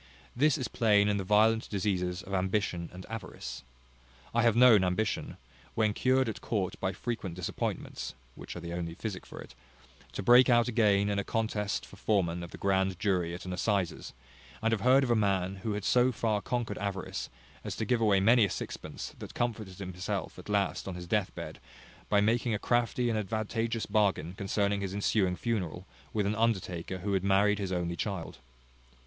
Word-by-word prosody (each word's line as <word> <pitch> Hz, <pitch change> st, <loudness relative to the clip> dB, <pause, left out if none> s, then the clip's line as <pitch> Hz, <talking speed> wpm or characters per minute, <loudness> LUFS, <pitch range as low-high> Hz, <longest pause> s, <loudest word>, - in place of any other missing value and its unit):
This 145 Hz, +3 st, +3 dB
is 130 Hz, -, -2 dB
plain 105 Hz, -4 st, +3 dB
in 105 Hz, 0 st, +1 dB
the 95 Hz, -, -2 dB
violent 110 Hz, +3 st, +3 dB
diseases 90 Hz, -3 st, -1 dB
of 100 Hz, -, -8 dB
ambition 95 Hz, -2 st, 0 dB
and 90 Hz, +1 st, -10 dB
avarice. 115 Hz, 0 st, -7 dB, 0.7 s
I 120 Hz, -, +3 dB
have 115 Hz, -2 st, +4 dB
known 120 Hz, -5 st, +7 dB
ambition, 90 Hz, +4 st, -1 dB, 0.4 s
when 110 Hz, -2 st, +2 dB
cured 130 Hz, +3 st, +2 dB
at 110 Hz, -, -4 dB
court 100 Hz, -5 st, -1 dB
by 95 Hz, -, 0 dB
frequent 100 Hz, -3 st, -4 dB
disappointments 90 Hz, -6 st, -4 dB, 0.2 s
(which -, -, -9 dB
are -, -, -5 dB
the 85 Hz, 0 st, -6 dB
only 85 Hz, -1 st, -4 dB
physic 100 Hz, -2 st, -5 dB
for -, -, -10 dB
it), -, -, -10 dB, 0.6 s
to -, -, -4 dB
break 125 Hz, +5 st, +7 dB
out 120 Hz, -1 st, +5 dB
again 105 Hz, -4 st, +3 dB
in 100 Hz, -1 st, 0 dB
a -, -, -1 dB
contest 105 Hz, -2 st, -1 dB
for 100 Hz, -, -14 dB
foreman 90 Hz, -5 st, +1 dB
of 85 Hz, -, -7 dB
the -, -, -10 dB
grand 95 Hz, -1 st, +1 dB
jury 90 Hz, -4 st, 0 dB
at 90 Hz, -, -9 dB
an 90 Hz, -, -4 dB
assizes; 95 Hz, -1 st, -1 dB, 0.5 s
and 115 Hz, 0 st, +1 dB
have 110 Hz, -3 st, 0 dB
heard 130 Hz, +4 st, +5 dB
of 125 Hz, -, 0 dB
a -, -, +5 dB
man 95 Hz, -3 st, +1 dB
who 105 Hz, +3 st, -3 dB
had 105 Hz, -1 st, -3 dB
so 125 Hz, +4 st, +4 dB
far 110 Hz, -3 st, 0 dB
conquered 120 Hz, -3 st, -2 dB
avarice, 100 Hz, -2 st, -4 dB, 0.3 s
as -, -, -4 dB
to 110 Hz, -, -2 dB
give 120 Hz, +1 st, +1 dB
away 105 Hz, -3 st, +4 dB
many 115 Hz, +4 st, +5 dB
a 100 Hz, -, +2 dB
sixpence, -, -, -6 dB
that -, -, -9 dB
comforted 110 Hz, -6 st, -2 dB
himself, 90 Hz, -2 st, -4 dB
at -, -, -11 dB
last, 100 Hz, -2 st, 0 dB
on 95 Hz, -, -4 dB
his 90 Hz, 0 st, -7 dB
deathbed, 100 Hz, +2 st, -2 dB, 0.5 s
by 105 Hz, -, +4 dB
making 115 Hz, +2 st, +2 dB
a -, -, 0 dB
crafty 120 Hz, +2 st, +1 dB
and 110 Hz, -, 0 dB
advantageous 110 Hz, +2 st, -2 dB
bargain 100 Hz, -5 st, +1 dB
concerning 100 Hz, +1 st, 0 dB
his 95 Hz, 0 st, -3 dB
ensuing 100 Hz, -2 st, +1 dB
funeral, 95 Hz, -5 st, -3 dB, 0.3 s
with 105 Hz, -2 st, 0 dB
an 100 Hz, -, +1 dB
undertaker 95 Hz, -6 st, -1 dB
who 100 Hz, +2 st, -2 dB
had 95 Hz, -1 st, +1 dB
married 100 Hz, +1 st, +3 dB
his 95 Hz, -2 st, -3 dB
only 85 Hz, -1 st, -1 dB
child. 95 Hz, -6 st, -4 dB
100 Hz, 190 wpm, -30 LUFS, 95-115 Hz, 0.7 s, known